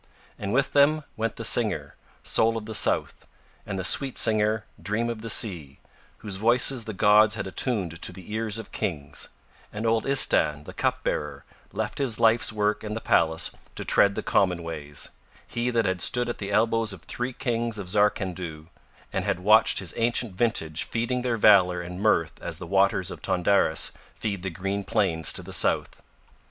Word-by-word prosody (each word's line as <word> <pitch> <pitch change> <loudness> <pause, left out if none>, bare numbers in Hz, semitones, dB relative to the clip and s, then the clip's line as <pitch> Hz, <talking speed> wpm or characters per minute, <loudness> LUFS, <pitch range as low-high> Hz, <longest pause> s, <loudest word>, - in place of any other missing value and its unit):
And 100 -1 -4
with 130 +5 +1
them 150 +2 +4
went 115 0 -2
the - - -5
singer, - - +2 0.3
Soul 115 0 +2
of 110 - -6
the 110 - -6
South, - - 0 0.4
and 100 -2 -4
the 95 - -3
sweet 135 +8 +1
singer, 110 0 +2 0.2
Dream 105 +6 -1
of 110 -2 -7
the 115 - -5
Sea, 85 - +1 0.5
whose 100 -2 -3
voices 120 +3 +3
the 110 - -5
gods 105 +1 +4
had - - -4
attuned 95 -4 -2
to - - 0
the 95 +2 -11
ears 110 -1 -2
of 110 - -9
kings, 75 -6 -4 0.4
and 105 +2 -5
old 115 0 +1
Istahn 75 - +3
the - - -9
cupbearer 75 -2 -2 0.3
left - - -4
his 130 -6 -1
life's 115 +1 +4
work 105 0 -1
in 105 0 -4
the - - -3
palace 80 -6 +1 0.2
to - - -6
tread 100 0 +4
the - - -3
common 90 -3 +1
ways, 75 -3 -5 0.4
he 120 +1 -2
that 115 -2 +1
had 95 -2 -1
stood 120 +5 +3
at 120 - -5
the 100 -1 -5
elbows 115 0 +1
of 90 - -12
three 125 +1 -4
kings 115 -3 -2
of 100 -3 -6
Zarkandhu 90 -5 -1 0.4
and - - -1
had 90 - -2
watched 105 +3 +5
his 95 -4 -2
ancient 115 -2 0
vintage 90 -7 -1
feeding 120 +2 -2
their 120 -2 -1
valour 95 -4 +5
and 90 +2 -7
mirth 85 -7 +1
as - - -5
the - - -8
waters - - +1
of - - -9
Tondaris 90 -3 +1 0.2
feed 100 -4 -4
the 95 - -3
green 95 +3 -3
plains 85 -8 +1
to - - -3
the - - -8
south. - - +1
105 Hz, 185 wpm, -25 LUFS, 90-115 Hz, 0.5 s, watched